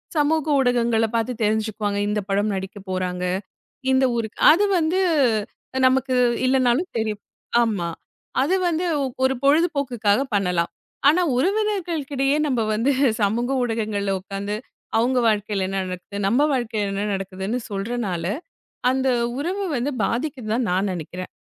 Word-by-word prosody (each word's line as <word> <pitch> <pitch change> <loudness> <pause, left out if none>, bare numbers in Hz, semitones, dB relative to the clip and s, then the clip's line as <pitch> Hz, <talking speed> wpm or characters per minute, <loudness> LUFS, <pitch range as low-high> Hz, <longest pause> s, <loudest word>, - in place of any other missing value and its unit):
சமூக 310 +1 +2
ஊடகங்களப் 235 -3 +2
பாத்துத் 230 0 -1
தெரிஞ்சுக்குவாங்க. 215 -1 0
இந்தப் 210 -1 -2
படம் 205 +2 +1
நடிக்கப் 190 +1 -7
போறாங்க. 180 -1 -2 0.7
இந்த 260 0 +4
ஊருக்கு 225 -2 -3
அது 395 +7 +4
வந்து 335 +3 +1 0.9
நமக்கு 260 0 +1 0.3
இல்லன்னாலும் 260 +6 +2
தெரியும். 215 -2 -2 0.4
ஆமா. 200 -7 -1 0.5
அது 310 +8 +2
வந்து 345 +1 0 0.4
ஒரு 260 0 +3
பொழுதுபோக்குக்காகப் 275 -6 +2
பண்ணலாம். 180 -4 +1 0.4
ஆனா 340 +5 +3 0.2
உறவினர்களுக்கிடையே 330 -6 0
நம்ப 255 -5 +1
வந்து 235 +6 +2 0.3
சமூக 225 +5 +1
ஊடகங்கள்ல 215 -4 -1
உக்காந்து, 200 +2 -4 0.4
அவுங்க 250 +3 +2
வாழ்க்கைல 205 -2 0
என்ன 195 0 -1
நடக்குது? 185 +2 -6
நம்ப 240 +8 +3
வாழ்க்கைல 220 -5 -1
என்ன 200 +1 -1
நடக்குதுன்னு 195 +4 -3
சொல்றனால, 200 -4 -3 0.7
அந்த 265 0 0 0.3
உறவு 375 +7 -2
வந்து 255 +4 -1
பாதிக்குதுதான் 245 -3 -2
நான் 190 +2 +1
நெனைக்கிறேன். 180 +1 -6
230 Hz, 120 wpm, -23 LUFS, 200-270 Hz, 0.9 s, இந்த